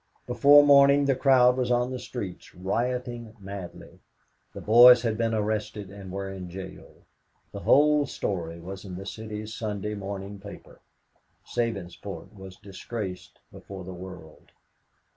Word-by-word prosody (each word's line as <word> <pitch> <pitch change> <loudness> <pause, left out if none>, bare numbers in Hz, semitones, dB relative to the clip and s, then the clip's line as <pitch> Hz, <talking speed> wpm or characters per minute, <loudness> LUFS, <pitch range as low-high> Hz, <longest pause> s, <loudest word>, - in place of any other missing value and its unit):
Before 140 +4 +6
morning 140 0 +6
the 135 -1 +2
crowd 125 -2 +4
was 125 -1 -1
on 125 +1 +1
the 130 - -4
streets, 105 -7 -8
rioting 120 +4 -3
madly. 100 -2 -9 0.5
The - - -9
boys 120 +2 +7
had 115 -2 0
been 115 0 0
arrested 105 -2 -3
and 100 -2 -10
were 100 +1 -4
in 90 -2 -8
jail. 95 +2 -10 0.6
The - - -7
whole 150 0 +4
story 85 -4 -4
was 95 +3 -8
in 95 -3 -8
the 95 +2 -8
City's 110 0 -7
Sunday 105 -1 -4
morning 100 0 -6
paper. 100 +1 -12 0.7
Sabinsport 100 -4 -5
was 95 -2 -11
disgraced 100 -1 -7
before 95 -2 -10
the 95 +1 -8
world. 90 -3 -12
105 Hz, 140 wpm, -26 LUFS, 95-120 Hz, 0.7 s, boys